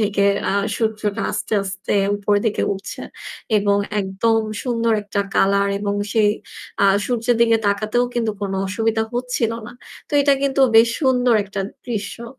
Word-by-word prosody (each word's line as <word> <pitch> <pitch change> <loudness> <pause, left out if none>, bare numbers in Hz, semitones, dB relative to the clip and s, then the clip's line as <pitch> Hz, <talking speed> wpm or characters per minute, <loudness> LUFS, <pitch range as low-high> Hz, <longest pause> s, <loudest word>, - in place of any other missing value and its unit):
থেকে 205 -1 +1 0.5
সূর্যটা 215 -2 -1
আস্তে, - - -4
আস্তে 190 0 -4 0.2
উপরের 205 0 +1
দিকে 215 - 0
উঠছে। 195 +1 -7 0.6
এবং 200 0 +2 0.2
একদম 200 +4 +1 0.2
সুন্দর 230 -2 0
একটা 205 0 -2
কালার 200 +1 +3
এবং 205 0 -2 0.2
সেই 215 -2 +4 0.5
আ - - +6 0.2
সূর্যের 240 -1 0
দিকে 230 -1 +5
তাকাতেও 215 +4 +1
কিন্তু 230 -2 0
কোনো 195 -1 -2
অসুবিধা 220 +3 0
হচ্ছিল 245 -2 -1
না। 240 - -9 0.4
তো - - -20
এটা 280 0 +4
কিন্তু 275 0 +1 0.2
বেশ 225 +1 +7 0.2
সুন্দর 250 -2 +3
একটা 200 0 -5 0.3
দৃশ্য। 230 0 -4
220 Hz, 145 wpm, -20 LUFS, 200-235 Hz, 0.6 s, বেশ